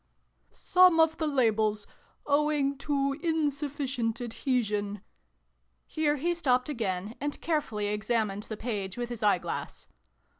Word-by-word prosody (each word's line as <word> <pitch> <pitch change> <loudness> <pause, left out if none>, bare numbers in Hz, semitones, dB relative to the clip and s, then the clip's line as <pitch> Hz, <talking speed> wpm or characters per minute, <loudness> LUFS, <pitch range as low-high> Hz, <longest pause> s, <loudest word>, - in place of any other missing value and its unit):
" - - -43
Some 360 -2 +4
of 320 0 +4
the 315 - -1
labels 220 -6 +1 0.4
owing 290 -1 +2
to 275 -1 0
insufficient 285 -7 -1
adhesion 215 -4 -1 0.8
Here 300 -1 0
he 335 +5 0
stopped 255 -6 +1
again, 210 -6 -2
and 290 0 -3
carefully 290 -11 -1
examined 210 -1 -1
the 215 - -4
page 205 -4 -4
with 240 0 -3
his 240 -2 -6
eyeglass. 200 -4 -1
250 Hz, 120 wpm, -29 LUFS, 215-295 Hz, 0.8 s, Some